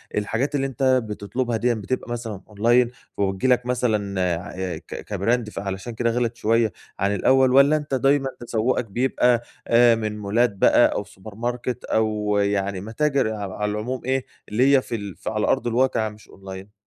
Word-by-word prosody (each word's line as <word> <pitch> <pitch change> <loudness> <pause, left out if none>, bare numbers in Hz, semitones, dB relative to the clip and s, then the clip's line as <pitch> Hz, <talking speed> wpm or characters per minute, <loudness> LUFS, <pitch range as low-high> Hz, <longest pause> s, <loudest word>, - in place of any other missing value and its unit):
الحاجات 115 +8 -1
اللي 135 -1 0
أنت 135 0 -5 0.2
بتطلُبها 115 +3 -3
ديًّا 120 +2 +1
بتبقى 120 +3 -4
مثلًا 115 -5 -5
أونلاين 120 +4 +3 0.3
وبتيجي 95 +4 0
لك 125 0 -1
مثلًا 105 -6 0 0.2
عأي 90 -3 -5
ك - - -10
كبراند 110 +3 0
فعلشان 100 +3 -5
كده 115 +1 0
غِلَت 120 0 -1
شويّة 115 -1 +2 0.3
عن 100 +1 +1
الأول 130 +5 +4
والّا 140 +3 +6
أنت 150 -2 -3
دايمًا 135 +1 +2
تسوّقك 120 +1 0
بيبقى 120 +2 +1 0.2
أ 120 0 +6
من 110 -1 -3
مولات 110 +4 +2
بقى - - +4
أو - - -2
سوبر 100 0 -13
ماركت 120 +1 -3
أو 105 -2 0
يعني 100 -2 0
متاجر 135 +1 0
ع 100 -3 -5
على 105 0 -1
العموم 115 +4 -3
إيه 130 0 0 0.2
اللي 130 +6 +4
هي 130 - +4
في 120 - -5
ال 100 -5 -6
على 105 -1 0
أرض 130 - +1
الواقع 120 -2 +1
مش 105 0 -16
أونلاين؟ 95 +1 -10
115 Hz, 170 wpm, -23 LUFS, 105-125 Hz, 0.3 s, والّا